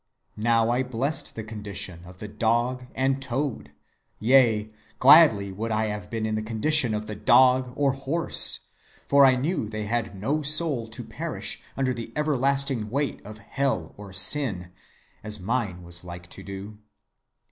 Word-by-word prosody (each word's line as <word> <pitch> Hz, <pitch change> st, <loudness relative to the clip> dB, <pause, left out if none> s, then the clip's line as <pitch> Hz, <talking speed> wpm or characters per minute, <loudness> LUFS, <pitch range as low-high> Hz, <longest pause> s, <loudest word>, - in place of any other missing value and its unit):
Now 115 Hz, 0 st, +2 dB
I 125 Hz, +2 st, +1 dB
blessed 135 Hz, +4 st, -3 dB
the 110 Hz, -, -6 dB
condition 105 Hz, -5 st, -4 dB
of 90 Hz, +1 st, -14 dB
the 105 Hz, -, -8 dB
dog 120 Hz, +4 st, -1 dB
and 135 Hz, +1 st, 0 dB
toad, 120 Hz, -, -4 dB, 0.5 s
yea, 110 Hz, -3 st, +3 dB, 0.3 s
gladly 125 Hz, -9 st, +6 dB
would 110 Hz, +4 st, -5 dB
I 110 Hz, 0 st, 0 dB
have 105 Hz, -4 st, -8 dB
been 115 Hz, -1 st, -3 dB
in 110 Hz, -, -2 dB
the 110 Hz, -, -2 dB
condition 115 Hz, +2 st, +2 dB
of 105 Hz, 0 st, -4 dB
the 110 Hz, -, -6 dB
dog 125 Hz, +4 st, +3 dB
or 140 Hz, -1 st, +1 dB
horse, 135 Hz, +5 st, +4 dB, 0.5 s
for 140 Hz, 0 st, +6 dB
I 130 Hz, -, +4 dB
knew 130 Hz, -, -2 dB
they 110 Hz, -1 st, -5 dB
had 110 Hz, -3 st, -3 dB
no 145 Hz, +10 st, -1 dB
soul 150 Hz, -5 st, -1 dB
to 110 Hz, -, -9 dB
perish -, -, -4 dB, 0.2 s
under 130 Hz, -1 st, 0 dB
the 115 Hz, -1 st, -8 dB
everlasting 140 Hz, -5 st, 0 dB
weight 140 Hz, +4 st, -3 dB
of 105 Hz, +1 st, -10 dB
Hell 110 Hz, -5 st, -3 dB
or 100 Hz, -1 st, -11 dB
Sin, 95 Hz, -3 st, +3 dB, 0.5 s
as 105 Hz, 0 st, -1 dB
mine 100 Hz, -3 st, -3 dB
was 85 Hz, 0 st, -6 dB
like 90 Hz, 0 st, -10 dB
to -, -, -6 dB
do. 100 Hz, +2 st, -9 dB
115 Hz, 160 wpm, -25 LUFS, 105-135 Hz, 0.5 s, gladly